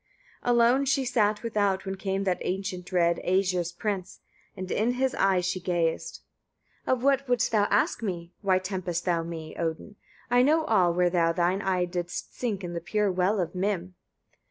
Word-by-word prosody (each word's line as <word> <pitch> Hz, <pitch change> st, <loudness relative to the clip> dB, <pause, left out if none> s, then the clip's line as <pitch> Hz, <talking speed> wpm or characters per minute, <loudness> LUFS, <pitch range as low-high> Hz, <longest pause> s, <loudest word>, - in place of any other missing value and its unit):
21. 245 Hz, 0 st, +2 dB
Alone 240 Hz, +4 st, +4 dB
she 270 Hz, 0 st, +1 dB
sat 215 Hz, -3 st, +1 dB
without, 205 Hz, -4 st, 0 dB
when 190 Hz, -, -3 dB
came 195 Hz, 0 st, -2 dB
that 185 Hz, -2 st, -1 dB
ancient 185 Hz, -1 st, -3 dB
dread 170 Hz, -2 st, +2 dB
Æsir's 180 Hz, -2 st, +1 dB
prince; 190 Hz, 0 st, -4 dB, 0.4 s
and 185 Hz, 0 st, -5 dB
in 230 Hz, +3 st, +1 dB
his 260 Hz, +1 st, 0 dB
eye 190 Hz, -2 st, +2 dB
she 185 Hz, +1 st, -2 dB
gazed. 175 Hz, -2 st, -1 dB, 0.6 s
22. -, -, 0 dB
"Of 255 Hz, -1 st, 0 dB
what 275 Hz, -1 st, +2 dB
wouldst 245 Hz, -1 st, +2 dB
thou 210 Hz, -2 st, +3 dB
ask 205 Hz, +3 st, +1 dB
me? 175 Hz, -5 st, -4 dB
Why 190 Hz, -2 st, +3 dB
temptest 185 Hz, -2 st, -3 dB
thou 170 Hz, -2 st, +1 dB
me? 165 Hz, -1 st, -7 dB
Odin! 170 Hz, +5 st, -4 dB, 0.3 s
I 245 Hz, 0 st, +5 dB
know 310 Hz, +4 st, +3 dB
all, 185 Hz, -, +3 dB
where 175 Hz, 0 st, +2 dB
thou 165 Hz, -2 st, +2 dB
thine 180 Hz, +3 st, +1 dB
eye 185 Hz, -3 st, +1 dB
didst 175 Hz, -1 st, -5 dB
sink 210 Hz, -6 st, -3 dB
in 175 Hz, -1 st, -5 dB
the 170 Hz, -, -4 dB
pure 205 Hz, +3 st, 0 dB
well 185 Hz, +3 st, +1 dB
of 170 Hz, -2 st, -2 dB
Mim." 185 Hz, -1 st, -2 dB
190 Hz, 185 wpm, -27 LUFS, 175-215 Hz, 0.6 s, I